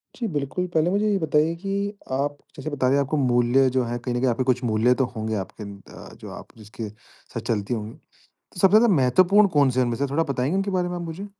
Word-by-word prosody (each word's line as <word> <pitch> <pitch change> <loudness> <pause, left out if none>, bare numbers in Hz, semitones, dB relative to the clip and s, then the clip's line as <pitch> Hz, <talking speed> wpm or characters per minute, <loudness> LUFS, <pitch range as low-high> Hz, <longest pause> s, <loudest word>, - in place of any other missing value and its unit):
जी, 235 -2 -3
बिल्कुल, 145 +6 -2
पहले 160 +2 +2
मुझे 205 +2 +1
ये 200 - +2
बताइए 155 +1 +1
कि 195 -1 -4 0.4
आप 145 +2 -1 0.2
जैसे 140 +3 -5
बता 130 -3 0
रहे 135 - +3
हैं 140 - +3
आपको 150 +3 -2
मूल्य 125 0 +3
जो 130 0 0
है 120 +1 -3
कहीं 120 0 -4
न - - 0
कहीं 130 0 +2
आपके 120 +2 0
कुछ 125 0 0
मूल्य 115 +2 +3
तो - - +3
होंगे 110 0 -3
आपके 100 +2 -6
अंदर 100 -1 -10
अ, - - -12
जो - - -11
आप - - -10
जिसके 110 0 -8
साथ 110 +2 -12
चलती 110 0 -1
होगी। 110 -1 -4
तो - - -25 0.4
सबसे 195 +2 +6
ज़्यादा 225 -5 +4
महत्वपूर्ण 185 +10 +4
कौन-से 130 -3 +3
है - - +3
उनमें 120 -1 -2
से 140 - 0
थोड़ा 160 +4 +1
बताएँगे 140 +4 -1
उनके 195 +1 -1
बारे 180 -1 0
में 175 - -4
आप 175 - -5
मुझे? 170 +5 -6
135 Hz, 255 wpm, -24 LUFS, 120-170 Hz, 0.4 s, सबसे